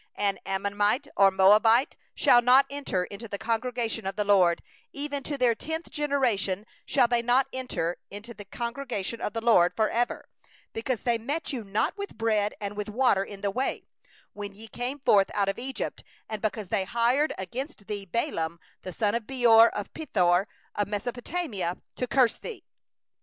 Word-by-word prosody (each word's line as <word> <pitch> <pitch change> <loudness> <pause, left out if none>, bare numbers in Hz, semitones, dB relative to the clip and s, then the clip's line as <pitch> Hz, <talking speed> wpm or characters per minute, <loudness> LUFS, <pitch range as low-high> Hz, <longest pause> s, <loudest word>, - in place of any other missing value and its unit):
4An 200 -1 0
Ammonite 205 +7 0
or 195 0 +6
a - - +3
Moabite 215 +6 +5 0.2
shall 240 - +5
not 255 +3 +6
enter 275 -10 -1
into 200 +5 -8
the 200 - -5
assembly 230 0 -1
of 195 0 -3
the 210 - 0
LORD; 185 -4 +4 0.3
even 285 0 -4
to 285 +1 -4
the 250 -3 +3
tenth 320 +7 -5
generation 240 - 0 0.2
shall 255 -4 +4
none 240 0 +2
of 235 - -15
them 255 +2 +4
enter 250 -10 -2
into 210 +4 -9
the 205 -2 -11
assembly 240 -2 -3 0.2
of - - -2
the 225 - -2
LORD 180 -6 +4
for 220 -1 +2
ever; 240 +1 -1 0.5
5because 230 +1 -2
they 235 -2 +1
met 290 +7 -3
you 240 -4 -3
not 205 +1 -1
with 400 - -6
bread 215 -2 +1
and 205 0 -4
with 210 0 -4
water 215 -3 +3
in 200 0 -10
the 200 - 0
way, 260 +7 -2 0.5
when 205 -1 -7
ye 220 +2 -9
came 245 +5 -4
forth 205 -8 +4
out 200 -1 +2
of 195 - -3
Egypt; 265 +2 -4 0.2
and 215 -2 -5
because 215 -3 -2
they 195 -2 0
hired 240 +8 +2
against 240 - -6
thee 200 -1 -5
Balaam 170 - -2 0.2
the 185 - -6
son 205 +1 0
of 230 -2 -2
Beor 235 -3 +6
from 205 - -4
Pethor 190 - +2 0.3
of 205 - -1
Aram 205 - 0
naharaim, 245 - -3 0.2
to 250 - -2
curse 250 -2 +3
thee. 470 - -8
225 Hz, 185 wpm, -27 LUFS, 200-255 Hz, 0.5 s, or